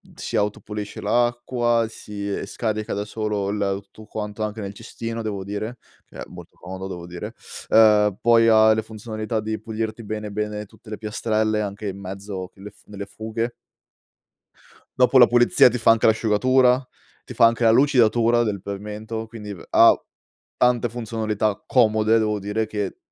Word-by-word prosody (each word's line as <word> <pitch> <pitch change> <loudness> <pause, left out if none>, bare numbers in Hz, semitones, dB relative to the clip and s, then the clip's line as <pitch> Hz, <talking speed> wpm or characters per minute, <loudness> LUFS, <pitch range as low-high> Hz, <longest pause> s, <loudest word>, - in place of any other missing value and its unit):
si - - -5
autopulisce 105 0 -3
l'acqua, 120 +1 +1
si 100 -2 -6
scarica 110 -3 -3
da 100 +1 -3
solo 105 -2 -3
il 105 0 -2
ehm, 100 0 -1
tutto 105 +2 -16
quanto, 105 0 -6
anche 105 +1 -3
nel 100 -1 -5
cestino 115 +1 -6
devo 100 -3 -4
dire, 110 +5 -5 0.3
che - - -15
è - - -5
molto - - -13
comodo 95 +1 -7
devo 90 -2 -7
dire, 90 0 -8 0.3
uhm, 105 -3 +5
poi 115 -1 +5
ha 110 0 +6
le 110 - 0
funzionalità 110 0 -5
di 110 0 -3
pulirti 110 0 -4
bene 105 0 -5
bene 105 0 -3
tutte 110 +2 -18
le 105 - -5
piastrelle, 110 0 -1
anche 105 +1 -5
in 100 0 -5
mezzo 95 -1 -7
che 95 - -19
le 105 0 -9
f - - -24
nelle 100 -1 -7
fughe. 110 +3 -4 1.4
Dopo 130 +1 +4
la 120 - +9
pulizia 120 +1 +5
ti 125 - -3
fa 115 0 +5
anche 115 - +2
l'asciugatura, 125 +4 +3 0.4
ti - - -9
fa 115 - +5
anche 115 +1 -1
la 110 - +6
lucidatura 120 -3 +4
del 100 -4 -2
pavimento, 105 +3 -6
quindi 105 -3 -9
v 90 - -11
ha - - +7 0.6
tante 125 -1 +2
funzionalità 110 -3 -2
comode, 110 -2 +3
devo 105 -1 0
dire, 105 +3 -2
che 105 -3 -4
110 Hz, 170 wpm, -23 LUFS, 105-115 Hz, 1.4 s, la